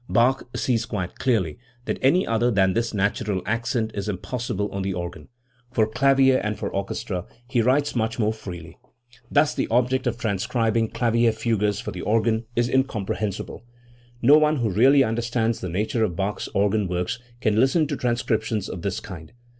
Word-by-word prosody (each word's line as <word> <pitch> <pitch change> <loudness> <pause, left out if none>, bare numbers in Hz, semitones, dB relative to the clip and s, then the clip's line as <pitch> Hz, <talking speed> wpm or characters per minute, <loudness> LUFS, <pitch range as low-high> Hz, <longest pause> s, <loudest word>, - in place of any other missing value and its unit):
Bach 130 +3 +2
sees 115 -3 0
quite 95 -7 -4
clearly 105 - 0 0.3
that - - -2
any 170 +8 +4
other 115 +2 +1
than 95 -4 +3
this 115 +2 0
natural 100 -1 -1
accent 115 +1 -1
is 100 +1 -3
impossible 105 +1 -3
on 100 - -3
the 95 -1 -2
organ. 85 -3 -6 0.4
For 115 -4 +3
clavier 135 +3 +4
and 105 0 -2
for - - -4
orchestra 100 -1 -3 0.2
he 125 -2 +1
writes 140 +5 +2
much 110 -1 -1
more 110 -2 +1
freely. 90 -5 -9 0.5
Thus 145 +1 +3
the - - -1
object 125 +2 +1
of 120 -1 -1
transcribing 115 +1 0
clavier 115 0 +2
fugues 110 -2 0
for 105 - -5
the 90 - -6
organ 110 +1 +1
is 120 0 +2
incomprehensible. 110 -7 -2 0.6
No 145 +5 +7
one 155 0 +3
who 120 -7 0
really 135 +8 +5
understands 115 0 -1
the 95 - -4
nature 110 +6 0
of 90 -6 -1
Bach's 100 +3 -2
organ 100 0 +2
works 90 +5 -2 0.2
can 110 -2 +1
listen 145 +6 +3
to 145 0 -3
transcriptions 120 -4 -1
of 90 - -6
this 95 0 -2
kind. 85 0 -10
110 Hz, 170 wpm, -24 LUFS, 100-120 Hz, 0.6 s, No